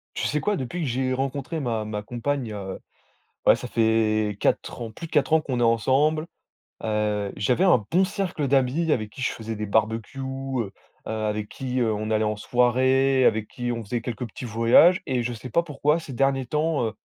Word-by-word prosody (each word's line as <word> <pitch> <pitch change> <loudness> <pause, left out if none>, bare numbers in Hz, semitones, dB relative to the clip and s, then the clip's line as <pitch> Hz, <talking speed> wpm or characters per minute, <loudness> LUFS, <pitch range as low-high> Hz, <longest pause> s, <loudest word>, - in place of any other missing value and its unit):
Tu - - -1
sais, 150 - 0
quoi? 210 - +1
Depuis 175 +7 -4
que 145 - -1
j'ai 130 +1 -1
rencontré 135 +4 -2
ma 115 -6 -2
ma 105 -1 -4
compagne, 120 +1 -3
heu, 95 -2 -5 0.7
ouais, - - +7
ça - - -6
fait 110 -2 +1
4 - - -1
ans, 115 - -4
plus 165 - -8
de - - -27
4 150 +1 +2
ans 160 - +5
qu'on 130 -5 -3
est - - +2
ensemble, 135 +8 +2 0.6
heu, 105 -2 -1
j'avais 125 - +1
un 150 - +4
bon 185 +3 +3
cercle 185 -7 -2
d'amis 135 +5 +2
avec 110 -6 0
qui 130 - -11
je - - +1
faisais 115 0 -6
des 105 0 -3
barbecues, 110 +4 -1
heu, 135 -5 -3 0.4
heu, - - -6
avec 105 -1 -2
qui, 130 -1 -3
heu, 115 -3 +2
on 110 +1 -3
allait 110 0 +2
en 105 0 0
soirée, 130 +3 +3
avec 110 -1 +2
qui 120 -1 -4
on 115 -1 -3
faisait 115 +3 -3
quelques 120 0 -4
petits 115 - -8
voyages 120 - +5
et 125 -3 0
je 120 +1 -2
sais 125 +3 -8
pas 170 +9 +2
pourquoi 150 0 0
ces 145 -4 -9
derniers 135 +1 +1
temps, 150 +1 0
heu, 110 - -3
125 Hz, 210 wpm, -25 LUFS, 110-140 Hz, 0.7 s, ouais